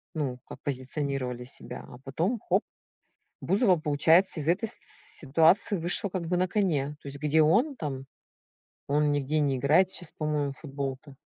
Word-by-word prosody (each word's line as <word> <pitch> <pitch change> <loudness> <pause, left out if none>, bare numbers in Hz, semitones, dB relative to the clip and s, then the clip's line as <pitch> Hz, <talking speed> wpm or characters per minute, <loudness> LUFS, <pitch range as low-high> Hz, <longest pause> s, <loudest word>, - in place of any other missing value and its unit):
Ну 135 -5 -2
как - - -10
позиционировали 130 -2 -2
себя, 125 - -8
а 125 - -11
потом- 170 - -1
хоп! 190 +5 +3 0.8
Бузова, 195 -1 +3
получается, 160 +4 +3
из 150 - -4
этой 195 +7 +2
с - - -5 0.4
ситуации 165 +7 +3
вышла, 175 +4 +1
как 180 -3 -4
бы, 180 +1 +1
на 185 +1 +2
коне. 155 -8 0
То - - -11
есть 140 0 -7
где 150 +2 +3
он 225 - +3
там... 135 - -5 0.8
Он 150 +1 +3
нигде 145 +2 0
не 140 -3 +1
играет 160 +9 +4
щас 175 -4 -3
по-моему 150 -2 -1
в - - -20
футбол-то. 140 -1 -6
150 Hz, 165 wpm, -28 LUFS, 140-180 Hz, 0.8 s, играет